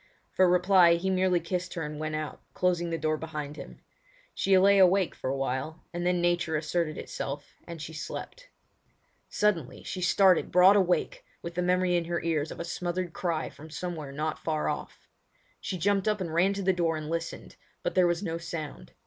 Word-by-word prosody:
For 185 -1 +4
reply 180 -1 +5
he 190 +3 -1
merely 185 -1 +2
kissed 180 +1 -4
her 165 - -3
and 150 0 -6
went 155 0 -3
out, 155 -1 -5
closing 175 -2 +1
the 165 - -1
door 155 0 0
behind 150 -2 -6
him. - - -10 0.5
She 195 -1 +3
lay 200 +1 +5
awake 190 0 +4
for - - -4
awhile, 135 +4 -3
and 175 +1 -2
then 180 0 +2
nature 175 -2 +1
asserted 155 0 -1
itself, 140 +1 -6
and 170 -1 -7
she 160 +1 -7
slept. - - -7 0.8
Suddenly 180 -11 0
she 185 - -5
started 185 -1 +4
broad 185 +3 +7
awake 200 - +1 0.2
with 170 0 -5
the 180 - -1
memory 180 0 +2
in 170 -1 +1
her 170 +1 -1
ears 160 -2 0
of - - -8
a 170 - -3
smothered 175 0 -3
cry 165 -3 -2
from 155 +2 -13
somewhere 160 -3 -5
not 155 +2 -3
far 155 -2 -1
off. - - -6 0.5
She 185 - -4
jumped 195 +3 +1
up 210 -1 +1
and 170 -4 -4
ran 185 +4 +3
to 200 0 -4
the 190 0 +3
door 165 -3 0
and 155 -1 -6
listened, 165 +1 -5 0.3
but - - -1
there 180 -1 +4
was 175 +2 0
no 165 -3 -3
sound. 155 - -7
170 Hz, 195 wpm, -28 LUFS, 155-185 Hz, 0.8 s, broad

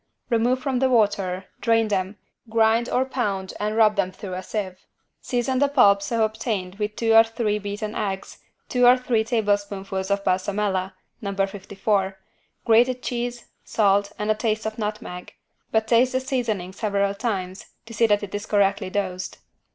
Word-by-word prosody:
Remove 240 +2 +2
from 260 -1 -1
the 265 0 +3
water, 200 -5 +1
drain 225 -1 +2
them, 195 0 -1 0.3
grind 225 +1 +3
or 255 +1 +1
pound 205 -8 -2
and 210 +1 -1
rub 215 -2 +5
them 185 -2 +1
through 185 0 -8
a 185 - -4
sieve. 190 -2 -4 0.4
Season 255 +1 -1
the 285 - +4
pulp 205 -8 +5
so 225 +3 0
obtained 215 -3 -3
with 210 0 -2
two 225 -1 +1
or 225 0 +9
three 225 -2 -1
beaten 210 +1 -4
eggs, 195 -3 -4 0.3
two 250 -1 +3
or 250 +1 +7
three 245 -3 +1
tablespoonfuls 200 -4 -1
of 200 0 0
=Balsamella= 190 0 0 0.3
(No. 200 -2 -4
54) 195 0 -1 0.5
grated 245 +2 +4
cheese, 240 0 -3 0.2
salt 200 -1 +2
and 210 +1 0
a - - +5
taste 220 0 -1
of 220 +1 -4
nutmeg, 210 -4 -5 0.4
but 220 0 +2
taste 245 +3 +4
the 260 - +2
seasoning 235 -9 -2
several 200 -1 0
times 195 -4 -4 0.2
to 230 - -10
see 230 +1 +3
that 205 -1 +2
it 200 - -7
is 205 +1 -4
correctly 195 -2 +2
dosed. 185 -2 -3
210 Hz, 165 wpm, -24 LUFS, 195-230 Hz, 0.5 s, or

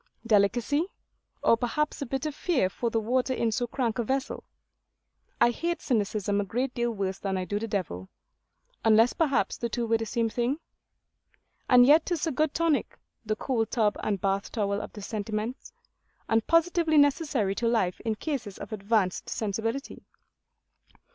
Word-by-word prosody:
Delicacy? 235 - +2 0.6
or - - +6
perhaps 300 +6 -1
a 280 - -3
bit 270 +4 -3
of 305 - -2
fear 275 - 0
for 235 - -2
the 225 - 0
water 255 +4 0
in 230 -2 0
so 245 +2 -1
crank 240 -1 -2
a - - +2
vessel? 265 +3 -2 1.0
I 240 0 +5
hate 340 +7 -2
cynicism 205 -4 0
a - - -1
great 245 +7 -2
deal 240 0 0
worse 195 -4 -3
than 195 -1 -2
I 185 - -2
do 205 +2 -2
the 225 - -4
devil; 160 - -3 0.7
unless 225 +2 +5
perhaps 295 -6 +1
the 235 - -3
two 235 +1 -2
were 225 0 +2
the 225 - -3
same 230 +1 0
thing? 240 +5 -1 1.1
And 245 -1 +8
yet 310 +4 +5
'tis 345 -3 -1
a 325 - 0
good 305 +1 0
tonic; 330 -3 +1 0.3
the 215 -1 -1
cold 225 -1 -1
tub 215 -4 +1
and 205 -2 -1
bath 195 +1 -1
towel 200 -2 -1
of - - -8
the 205 - -9
sentiments; 215 +4 -4 0.6
and 225 0 +1
positively 330 -1 +3
necessary 285 - +3
to 235 +3 -1
life 220 -6 +1
in 225 -2 -2
cases 245 - -4
of - - -8
advanced 200 -2 0
sensibility. 225 +5 -3
230 Hz, 170 wpm, -27 LUFS, 210-270 Hz, 1.1 s, And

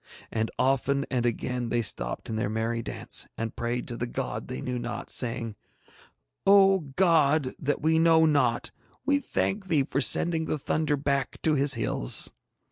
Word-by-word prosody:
And 110 0 -1
often 135 +1 +1
and 120 -2 0
again 120 +1 -3
they 120 0 0
stopped - - 0
in 110 - -4
their 110 -1 -2
merry 115 +2 -2
dances - - -2
and 115 0 -4
prayed 120 +1 -3
to 120 - -6
the 120 +1 -4
God - - -5
they 65 - -6
knew 125 - -4
not, 120 0 -6
saying, 115 -3 -2 0.9
'O, 195 -1 +6 0.2
God 155 -6 +3
that 145 +1 -2
we 160 +1 +3
know 165 -1 +4
not, 150 -2 +1 0.3
we 285 0 +2
thank 200 -7 -2
Thee 155 -6 +2
for 135 +1 -2
sending 160 +4 +4
the 155 - -2
thunder 150 +1 -1
back 140 -1 -2
to 155 - +3
his 140 -1 +4
hills.' 85 - +3
135 Hz, 170 wpm, -26 LUFS, 120-160 Hz, 0.9 s, O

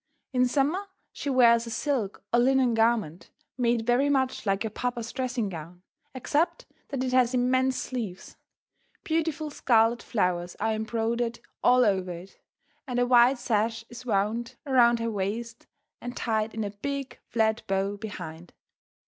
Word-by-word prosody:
In 250 0 +3
summer 295 +10 0 0.3
she 285 - -4
wears 235 -3 +5
a - - -5
silk 230 -3 -2
or 235 - +5
linen 260 -1 +3
garment 225 -7 +1 0.3
made 235 -2 +1
very 250 +4 +3
much 260 -5 0
like 195 +1 +1
your 220 - -3
papa's 240 0 -3
dressing 255 -4 -2
gown, 175 0 -9 0.3
except 295 +6 0 0.2
that 275 -3 -3
it 255 -1 -2
has 255 -1 +3
immense 255 +1 +2
sleeves. 220 -8 -5 0.7
Beautiful 315 -1 -1
scarlet 230 -3 +3
flowers 180 -4 -1
are 220 0 +1
embroidered 230 +2 -1 0.2
all 250 0 +5
over 190 -3 +1
it, 175 +3 -12 0.5
and 250 -2 -3
a 245 - +3
wide 245 +1 +5
sash 225 -1 -1
is 240 +1 -10
wound 225 +1 -1
around 240 -4 +5
her 230 0 -2
waist 220 +3 -4 0.3
and 245 0 -6
tied 220 -1 -1
in 220 - -2
a 205 - -3
big, 270 +4 -5
flat 220 -1 +1
bow 195 +1 0
behind. 175 -6 -8
235 Hz, 150 wpm, -27 LUFS, 215-255 Hz, 0.7 s, wears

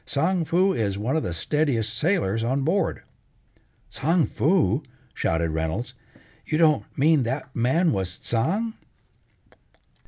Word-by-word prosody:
Tsang 165 +4 0
Foo 185 +4 +2
is 100 - -1
one 115 +8 -1
of 160 - +1
the 90 - -3
steadiest 115 - 0
sailors 120 - 0
on 130 +4 0
board." 180 +7 0 0.9
"Tsang 160 +3 +1
Foo!" 150 - +1 0.3
shouted 80 0 0
Reynolds. 80 +10 -3 0.5
"You 155 - -1
don't 155 -3 +3
mean 150 +1 +4
that 130 +2 -4
man 145 +9 +2
was 95 -6 -2
Tsang?" 195 - -1
135 Hz, 125 wpm, -24 LUFS, 115-165 Hz, 0.9 s, mean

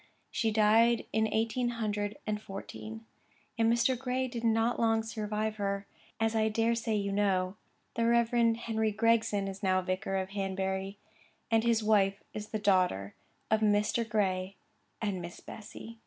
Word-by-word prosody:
She 225 - +1
died 220 +2 +4
in 220 0 +2
eighteen 230 +2 0
hundred 210 -2 -2
and 210 0 -2
fourteen, 110 - -8 0.5
and 225 -1 +3
Mr. 235 +2 +3
Gray 255 +1 -1
did 240 -2 -6
not 225 +1 +2
long 225 -1 +2
survive 215 -1 -3
her. 200 -1 -2 0.3
As 225 0 +1
I 220 0 +3
dare 225 +2 +2
say 230 -1 -1
you 200 -1 -1
know, 195 -2 +1 0.4
the 230 0 +1
Reverend 235 -1 +3
Henry 220 -2 -1
Gregson 220 -2 +2
is 195 +1 -6
now 185 -2 +2
vicar 185 +1 -2
of 190 0 -2
Hanbury, 195 0 -2 0.5
and 225 0 +4
his 230 -2 +2
wife 200 -2 +2
is 210 0 -5
the 215 - -3
daughter 185 - +1 0.4
of 220 - +4
Mr. 210 +2 +2
Gray 190 -3 0 0.5
and 195 -4 -1
Miss 175 0 -8
Bessy. 225 +1 -10
215 Hz, 155 wpm, -31 LUFS, 195-230 Hz, 0.5 s, died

